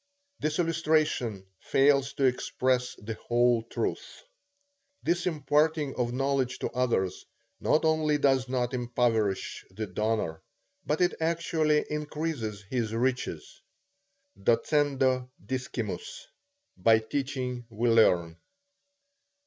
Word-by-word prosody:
The - - 0
illustration 155 - +1
fails 140 0 +3
to 140 - -2
express 125 0 +1
the 110 +2 -6
whole 120 0 +3
truth. 115 - -4 0.8
This 175 +2 0
imparting 150 -2 +1
of 120 -1 -1
knowledge 135 0 0
to - - -3
others, 115 -7 0 0.4
not 155 +1 +2
only 155 -1 +2
does 135 -3 +2
not 125 -1 -1
impoverish 120 -5 0
the 110 +4 -5
donor, 105 -4 -2 0.5
but 150 +3 0
it 180 0 +3
actually 160 -2 +1
increases 150 -8 -3
his 115 +1 -2
riches. 125 -9 -2 0.8
Docendo 130 0 +2 0.2
discimus. 280 - -4 0.5
By 115 -1 +5
teaching 125 0 -3
we 115 +2 -1
learn. 90 -8 +4
130 Hz, 100 wpm, -28 LUFS, 115-150 Hz, 0.8 s, By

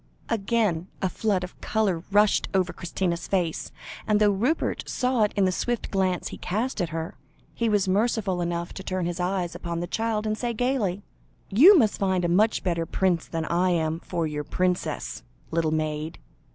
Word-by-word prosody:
Again 205 -5 0
a 190 - 0
flood 195 -1 0
of 180 - -9
colour 200 -6 0
rushed 210 +1 +4
over 185 -2 +1
Christina's 175 0 -2
face, 175 -4 -1 0.4
and 210 -1 +3
though 210 -1 +5
Rupert 240 +11 -1
saw 250 -2 +1
it 210 - -4
in 195 -1 +3
the 185 - +2
swift 240 +5 -2
glance 185 -3 0
he - - -9
cast 220 +5 -2
at 175 - -1
her, 165 0 -5 0.3
he 230 -1 0
was 205 -3 +2
merciful 195 -2 +1
enough 170 0 -2
to 190 - -7
turn 185 -2 -2
his 175 +1 -3
eyes 180 -1 -1
upon 170 -1 -4
the 175 - -2
child, 220 +3 -1
and 215 0 0
say 235 +1 -3
gaily 215 -6 0 0.5
"You 335 - +8
must 220 -8 +2
find 190 -2 +1
a - - +1
much 210 +6 +3
better 170 -3 -1
prince 180 -2 0
than 165 -1 -3
I 175 +3 +2
am 160 -2 0
for 170 -1 -2
your 150 -1 -3
princess, 180 - -2 0.3
little 165 -1 +1
maid. 155 0 -2
185 Hz, 185 wpm, -26 LUFS, 170-215 Hz, 0.5 s, You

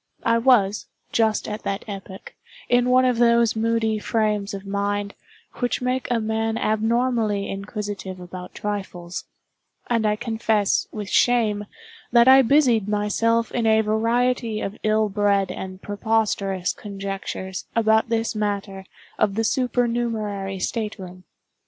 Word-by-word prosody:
I 230 0 +3
was, 230 -5 +3 0.2
just 220 -2 +1
at 210 0 -5
that 195 +1 -3
epoch, 195 -2 -8 0.3
in 245 0 +3
one 255 +1 +5
of 250 -2 +1
those 235 -1 +4
moody 225 -1 0
frames 210 -2 0
of 195 0 -8
mind 200 0 -2 0.5
which 245 -1 0
make 255 0 -1
a 240 -2 +1
man 220 0 -1
abnormally 220 -1 +1
inquisitive 200 -2 -5
about 180 0 -9
trifles: 190 -4 -5 0.7
and 225 -2 +2
I 210 - +2
confess, 220 -2 0
with 210 -2 -6
shame, 215 -3 +2 0.5
that 235 0 +6
I 265 +1 +9
busied 245 -5 +3
myself 215 +2 +1
in 235 -2 0
a 220 0 +5
variety 230 +1 0
of 200 -1 -4
ill 215 0 +2
bred 200 -2 +1
and 185 0 -7
preposterous 205 -3 0
conjectures 195 -2 -6
about 220 -1 +3
this 225 0 0
matter 200 -2 -3 0.3
of 200 -2 +2
the 225 - 0
supernumerary 230 -5 -1
state 215 +3 -3
room. 185 -1 -10
215 Hz, 135 wpm, -23 LUFS, 200-230 Hz, 0.7 s, I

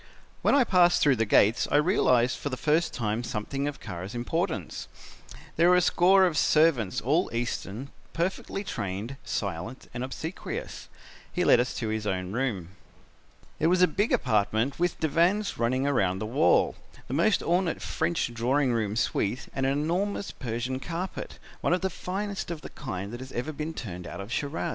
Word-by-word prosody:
"When - - +4
I 280 - +6
passed 180 -5 +4
through 140 -4 +4
the 115 0 +1
gates 105 +3 +4
I - - 0
realized 130 - +3
for 145 - -3
the 130 - -4
first 155 +5 +2
time 110 0 -2
something 125 +5 -3
of 145 - -5
Kara's 90 +5 -7
importance. 160 - -2 0.7
There 170 +2 +5
were 180 - +6
a - - +6
score 190 +3 +5
of 160 -5 +1
servants, 150 - +3
all 155 - +1
Eastern, 115 +1 -4 0.2
perfectly 190 +3 -2
trained, 105 - -4
silent 100 +5 -4
and 120 +1 -3
obsequious. 160 +7 -6 0.4
He - - 0
led - - +6
us 125 +1 -1
to 115 -3 -2
his 110 -1 -2
own 90 -1 -2
room. 105 -8 -2 0.9
"It 160 - +3
was 180 +1 +4
a - - +7
big 205 +7 0
apartment 110 +3 +1
with 175 -1 0
divans 175 +7 +1
running 125 +3 +1
round 100 -10 +1
the 110 - -3
wall, 110 -6 +3 0.3
the - - -5
most 175 +8 +3
ornate 175 0 +1
French 170 -8 -1
drawing 125 +3 +1
room 110 -3 -1
suite 115 +1 -1
and 135 0 0
an - - +2
enormous 175 +8 -1
Persian 125 +1 -3
carpet, 175 +6 -5 0.2
one - - +1
of 180 - +1
the 190 0 -1
finest 195 +2 -4
of 170 -3 -5
the - - -9
kind 100 -6 -5
that 120 - -6
has 130 +1 -9
ever 125 +6 -3
been 155 +2 -5
turned 90 -6 -6
out - - -7
of 100 +3 -7
Shiraz. 150 +4 -2
135 Hz, 180 wpm, -27 LUFS, 115-170 Hz, 0.9 s, a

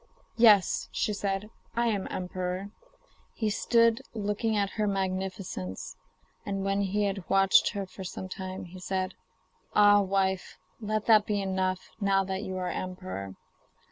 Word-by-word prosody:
'Yes,' 215 -5 +5
she 210 - 0
said, 200 +1 -2 0.2
'I 235 +1 +2
am 210 -4 0
emperor.' 185 +2 -4 0.6
He 215 -2 0
stood 230 +1 +3
looking 210 +1 0
at 200 -1 +1
her 215 -1 -1
magnificence, 185 - -3 0.5
and 195 -1 -3
when 195 0 +1
he 200 +1 0
had 195 -2 -2
watched 195 +2 +5
her 200 -2 -3
for 190 +1 -10
some 185 +1 -6
time, 185 0 -6
said: 185 0 -2 0.6
'Ah, 205 0 +7
wife, 190 -1 0 0.2
let 215 -1 -2
that 215 -2 +5
be 210 -1 0
enough, 190 -1 -1
now 195 -1 +3
that 190 0 -3
you 190 -3 -4
are 180 -1 -2
emperor. 95 - -5
195 Hz, 140 wpm, -29 LUFS, 185-205 Hz, 0.6 s, Ah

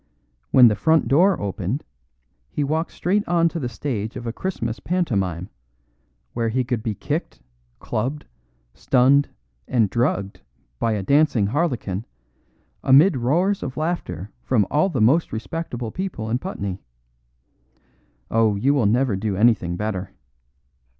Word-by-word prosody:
When 125 -2 +7
the 110 - +3
front 160 -1 +2
door 175 +9 +4
opened 100 - -3 0.7
he 145 - -2
walked 160 +4 -1
straight 200 +3 0
on 170 -1 +3
to 165 - -5
the 125 -5 -3
stage 110 -3 -4
of 120 - -6
a 115 - -3
Christmas 120 -11 -3
pantomime, 100 - -1 0.8
where 115 -1 -1
he 130 +3 0
could 120 -2 -2
be 110 -1 -3
kicked, - - -4 0.4
clubbed, 130 +7 -3 0.5
stunned 135 +2 +3 0.4
and 110 -6 +2
drugged 100 - -1 0.4
by 115 - +1
the 100 - -3
dancing 140 -3 +3
harlequin, 115 - -1 0.8
amid 145 +7 +6
roars 170 +11 +1
of 130 - -5
laughter 110 - -3
from 110 -6 +2
all 155 +6 +3
the 140 - -2
most 140 +10 +3
respectable 120 -1 -4
people 170 - -4
in 120 - +1
Putney. 100 - -5 1.5
Oh, 110 -2 +3
you 130 +8 +2
will 130 -8 +2
never 120 0 +2
do 100 +1 -2
anything 105 -5 +2
better. 100 -2 -3
120 Hz, 135 wpm, -22 LUFS, 105-155 Hz, 1.5 s, When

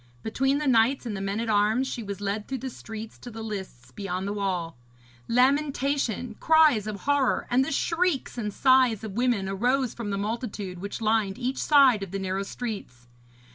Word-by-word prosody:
Between 270 +5 +1
the 300 - -2
knights 255 +1 +3
and 220 -3 -3
the 195 - -4
men 195 +2 -2
at 230 - -2
arms 215 +4 +2
she 240 - -4
was 200 -2 -6
led 205 +1 -3
through 265 - -3
the 260 +1 -5
streets 220 -1 -9
to 245 - -9
the 225 -1 -7
lists 190 - -7
beyond 195 -1 -4
the 200 - -2
wall. 185 -5 -2 0.5
Lamentation, 270 -2 +1
cries 310 -10 +4
of 205 -2 -5
horror, 285 -2 +1
and 255 +2 +4
the - - -3
shrieks 330 0 0
and 215 -4 -3
sighs 255 -3 +3
of 220 - -5
women 230 -2 0
arose 245 +6 0
from 230 -3 -5
the 200 - -1
multitude 205 -3 -4
which 200 +4 -6
lined 215 -3 +1
each 255 +2 -2
side 275 -7 +5
of 195 - -5
the 195 - -4
narrow 190 0 -2
streets. 200 - -6
225 Hz, 190 wpm, -26 LUFS, 200-260 Hz, 0.5 s, side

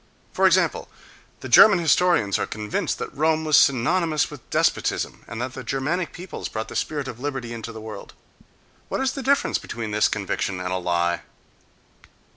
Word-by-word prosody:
For - - +4
example, - - +1 0.5
the - - -6
German 200 -4 +8
historians 170 - +2
are - - -1
convinced 105 -1 -3
that - - -6
Rome 160 +1 +1
was 155 -1 +3
synonymous 155 +5 +3
with 145 -5 -12
despotism - - 0
and 110 - -7
that 125 +1 -3
the 130 - -7
Germanic 150 +8 -2
peoples 180 +1 -7
brought 110 0 -5
the - - -9
spirit 145 -3 -2
of 120 - -7
liberty 135 -4 -4
into 115 0 -6
the 110 -1 -9
world: 110 -1 -9 0.8
what - - -2
is 265 0 +1
the 275 - -5
difference 280 +2 +1
between 115 -2 -6
this 105 +1 +3
conviction 95 -2 -2
and 90 0 -3
a - - 0
lie? 85 -1 0
130 Hz, 175 wpm, -23 LUFS, 110-160 Hz, 0.8 s, German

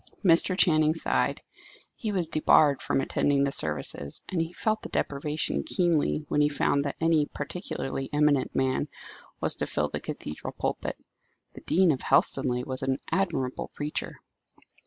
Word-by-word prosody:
Mr. 180 +2 +5
Channing 155 -4 +4
sighed. 165 - 0 0.5
He 220 -4 -3
was 185 -4 0
debarred 155 -2 +4
from - - 0
attending 140 +1 +1
the 140 - +1
services, 75 - -3
and 175 -3 0
he 165 0 -3
felt 215 +4 -1
the - - -8
deprivation 150 +2 -1
keenly 165 -4 +1
when 150 - +1
he 150 - +4
found 140 0 +1
that 140 - -3
any 160 -2 +3
particularly 140 -3 -5
eminent 150 -2 +2
man 130 0 +1 0.5
was - - +3
to - - -2
fill - - -1
the - - -4
cathedral 75 - -6
pulpit. - - -2 0.6
The - - -11
dean 180 0 +3
of 135 - -2
Helstonleigh 125 -2 +2
was 130 0 -3
an 135 0 0
admirable 160 -10 -1
preacher. 150 +1 -3
150 Hz, 155 wpm, -27 LUFS, 135-165 Hz, 0.6 s, Mr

